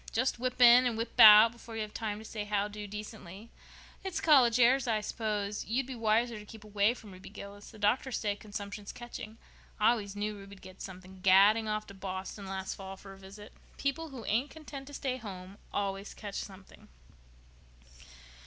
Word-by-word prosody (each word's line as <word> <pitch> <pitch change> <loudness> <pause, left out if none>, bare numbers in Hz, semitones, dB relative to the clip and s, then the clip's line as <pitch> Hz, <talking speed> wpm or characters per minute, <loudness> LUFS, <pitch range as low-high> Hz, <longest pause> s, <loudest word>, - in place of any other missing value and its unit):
"Just 255 +1 0
whip 255 0 -3
in 245 +1 +8
and 230 -2 -2
whip 230 +1 -5
out 215 +1 +10
before 235 -1 -11
you 220 - -2
have 210 - -9
time 210 -2 -3
to 220 - -10
say 215 -1 -5
how 205 -1 0
do 210 0 -8
decently. 210 0 -9 0.5
It's 385 -2 -3
college 255 -6 +5
airs, 255 +2 +4
I 220 -2 +1
s'pose. 210 -1 -3
You'd 245 +4 -1
be 265 - -6
wiser 230 0 +1
to 210 - -11
keep 220 -1 -12
away 210 +2 +1
from 215 -4 -13
Ruby 185 +1 -12
Gillis. 200 0 -10
The 220 - -14
doctors 220 +5 +1
say 205 -2 -1
consumption's 205 -1 -7
catching. 230 -2 -9 0.4
I 210 - +5
always 205 -4 -3
knew 210 +1 -3
Ruby'd 195 -1 -12
get 185 0 -12
something, 185 0 -10
gadding 200 +4 +5
off 215 0 -2
to - - -12
Boston 190 +1 -6
last 190 0 -4
fall 195 0 -9
for 195 0 -12
a 195 - -15
visit. 200 +2 -12 0.2
People 315 +4 -2
who 255 -5 -9
ain't 245 +7 0
content 285 -4 -10
to 290 - -11
stay 260 -2 -2
home 195 -4 -9
always 195 0 -3
catch 205 -2 -8
something." 190 -1 -10
210 Hz, 190 wpm, -31 LUFS, 200-235 Hz, 0.5 s, out